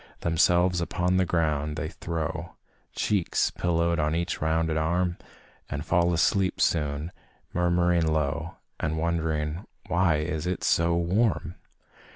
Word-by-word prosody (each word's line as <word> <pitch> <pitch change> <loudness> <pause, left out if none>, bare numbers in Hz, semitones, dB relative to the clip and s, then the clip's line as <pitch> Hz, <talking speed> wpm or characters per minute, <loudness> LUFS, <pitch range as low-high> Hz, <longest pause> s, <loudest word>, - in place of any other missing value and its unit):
Themselves 85 +2 +3
upon 90 +2 0
the 95 -1 +2
ground 75 -3 0
they 80 0 -3
throw, 85 0 -4 0.4
Cheeks 100 -5 +1
pillowed 85 -1 0
on 75 +1 +1
each 85 +1 -2
rounded 80 +1 +1
arm 85 +3 0 0.5
And 75 +3 -4
fall 85 +1 +2
asleep 90 +2 +1
soon, 75 0 0 0.4
murmuring 85 -1 +2
low, 75 0 -1 0.2
And 80 0 -1
wondering 80 0 -1 0.3
"why 85 -1 +3
it 80 +2 -2
is 90 -1 -2
so 85 0 +3
warm?" 90 0 +1
85 Hz, 125 wpm, -27 LUFS, 80-90 Hz, 0.5 s, Themselves